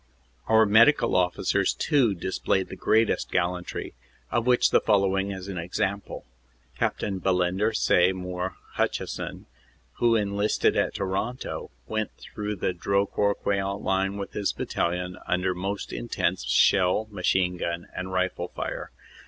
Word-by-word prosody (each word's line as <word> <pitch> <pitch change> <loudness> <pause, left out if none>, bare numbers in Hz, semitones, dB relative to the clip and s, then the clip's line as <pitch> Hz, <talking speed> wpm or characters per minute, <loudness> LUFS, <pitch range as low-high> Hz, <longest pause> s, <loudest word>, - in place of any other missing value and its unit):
Our 110 0 +5
medical 115 +8 +5
officers 90 -1 +1
too 125 -9 +2
displayed 95 +1 -1
the - - -7
greatest 110 0 +2
gallantry, 90 0 -2 0.4
of 120 +1 0
which 125 -1 +4
the - - +5
following 100 -2 +2
is 95 -1 -6
an 95 -3 -4
example. 95 +4 -3 0.5
Capt. - - -1
Bellender 95 +1 +1
Sey 90 -4 +3
mour 90 0 -4 0.2
Hutcheson, - - -2 0.5
who 120 -1 +4
enlisted 100 0 +1
at - - 0
Toronto, 100 +6 -3 0.2
went 110 +6 -2
through 105 0 -5
the 90 -1 -1
Drocourt 100 +2 0
Queant 100 0 -1
line 95 +1 0
with 100 - -6
his 100 -1 -1
battalion, 90 +1 -2
under 90 +1 +1
most 95 +2 -4
intense 90 - -1
shell, 95 - +3
machine 90 -1 +1
gun 85 0 -3
and 95 +1 -4
rifle 95 0 -1
fire. - - -5
95 Hz, 130 wpm, -26 LUFS, 90-105 Hz, 0.5 s, Our